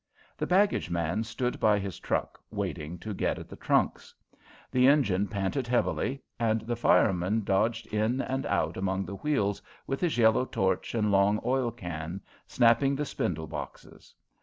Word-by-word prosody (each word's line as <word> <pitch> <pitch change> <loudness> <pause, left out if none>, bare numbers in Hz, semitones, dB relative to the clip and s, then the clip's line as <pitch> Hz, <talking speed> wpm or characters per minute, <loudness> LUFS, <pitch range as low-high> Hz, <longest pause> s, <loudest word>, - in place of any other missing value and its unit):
The - - -3
baggage 195 - +2
man 85 +4 -1
stood 125 +2 -3
by 105 -1 +4
his 100 -4 -5
truck, - - -2
waiting 80 +3 -4
to 105 +3 -5
get - - -1
at - - -8
the - - -9
trunks. - - 0 0.6
The 125 0 +4
engine 105 -9 +3
panted 100 +7 -2
heavily, 125 +2 0 0.2
and 110 -1 +1
the 120 +2 -3
fireman 105 -2 +2
dodged 110 +4 +1
in 110 +4 +1
and 135 0 -2
out 80 +2 0
among 95 0 -1
the 100 +2 -6
wheels 105 -9 0 0.2
with 135 - -3
his 175 -7 0
yellow 115 +2 +4
torch 95 0 -1
and 105 -2 +1
long 100 +2 +3
oil 130 -1 +1
can, 85 -3 -6 0.3
snapping 120 +3 +3
the 150 +2 -2
spindle 90 - -2
boxes. - - -9
110 Hz, 160 wpm, -28 LUFS, 95-125 Hz, 0.6 s, by